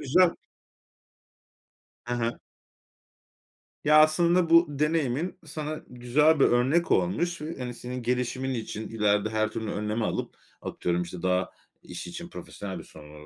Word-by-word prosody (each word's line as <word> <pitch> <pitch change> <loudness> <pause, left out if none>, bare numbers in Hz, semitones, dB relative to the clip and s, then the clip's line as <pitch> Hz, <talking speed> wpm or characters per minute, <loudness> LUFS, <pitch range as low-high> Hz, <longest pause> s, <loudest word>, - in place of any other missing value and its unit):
güzel. 170 +6 +4 1.7
Hı 120 - -2
hı. 120 -1 -2 1.5
Ya, 150 +1 +6
aslında 170 +2 +3
bu 165 +1 +7
deneyimin 150 +2 0
sana 155 0 -5
güzel 140 +6 +2
bir - - +6
örnek 130 +8 +2
olmuş 130 - +1
ve, 155 +2 -5
hani, 125 -1 -4
senin 125 +1 -6
gelişimin 125 +2 -1
için 110 -2 -5
ileride 105 -1 +1
her 110 0 0
türlü 110 -1 -4
önlemi 105 +2 -2
alıp, - - -3 0.3
atıyorum, 90 0 -1
işte, 90 0 -6
daha, 90 0 +1 0.3
iş - - -7
için - - -7
profesyonel - - -7
bir - - -9
sorun, 75 -1 -13
125 Hz, 135 wpm, -27 LUFS, 110-155 Hz, 1.7 s, bu